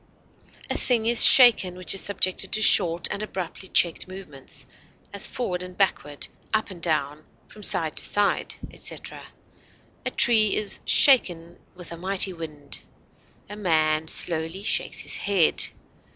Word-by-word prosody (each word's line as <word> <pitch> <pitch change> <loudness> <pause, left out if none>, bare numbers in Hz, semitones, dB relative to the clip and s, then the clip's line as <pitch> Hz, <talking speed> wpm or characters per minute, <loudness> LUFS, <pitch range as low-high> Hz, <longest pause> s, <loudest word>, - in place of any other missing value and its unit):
A - - -3
thing 235 -3 -1
is 235 0 +6
shaken 230 -8 +6
which 185 0 0
is 195 - +1
subjected 185 -2 -1
to 215 - 0
short 170 -3 +3
and 200 - -5
abruptly 190 -2 -7
checked 170 0 +1
movements, 180 -8 -10 0.5
as 200 +2 -1
forward 180 -8 -4
and 180 0 -10
backward, 145 -7 -2 0.3
up 215 -2 -2
and 175 -2 -12
down, 155 -2 -2 0.2
from 210 - -16
side 160 -5 -1
to - - -1
side, 205 0 -1 0.2
etc. - - -7 0.8
A - - -2
tree 220 -4 +3
is 210 -1 -1
"shaken 175 - +3 0.2
with 180 -1 -11
a 170 - -8
mighty 190 +1 +2
wind;" 150 -4 -10 0.7
a 205 - -9
man 160 -5 0
slowly 165 +4 -2
shakes 220 - -1
his - - -1
head. 195 -5 +1
185 Hz, 145 wpm, -23 LUFS, 165-205 Hz, 0.8 s, is